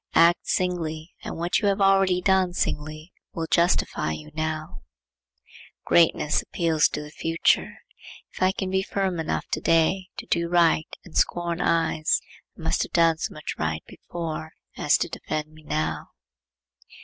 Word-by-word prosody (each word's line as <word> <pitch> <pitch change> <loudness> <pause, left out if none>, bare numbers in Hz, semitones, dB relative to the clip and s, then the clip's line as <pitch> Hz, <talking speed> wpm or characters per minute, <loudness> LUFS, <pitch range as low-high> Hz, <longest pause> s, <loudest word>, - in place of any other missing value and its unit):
Act 170 +1 +5
singly, 165 -3 -2
and - - -5
what 170 +2 +1
you 205 - 0
have 200 0 +1
already 195 -2 +4
done 190 -1 +2
singly 155 0 -3 0.2
will 165 - -3
justify 170 - +1
you 75 -1 -9
now. 155 0 -3 1.1
Greatness 160 -3 +3
appeals 165 -3 +2
to 150 - -5
the 150 - -11
future. 165 +1 +1 0.6
If - - -10
I 185 0 +4
can 190 -1 -4
be 190 0 +2
firm 190 -2 -2
enough 160 - -2
to - - -2
day 165 +3 +2
to - - -6
do 170 0 0
right 170 -2 +3 0.2
and 175 - -14
scorn 175 -1 +1
eyes, 165 -1 +2 0.4
I - - -11
must 160 - +1
have - - -4
done 165 -2 +4
so - - -2
much 155 - -5
right 80 0 -2
before 160 -2 -6 0.2
as - - +3
to - - -1
defend 155 0 -4
me 155 - -15
now. 80 - -2
165 Hz, 160 wpm, -25 LUFS, 155-180 Hz, 1.1 s, Act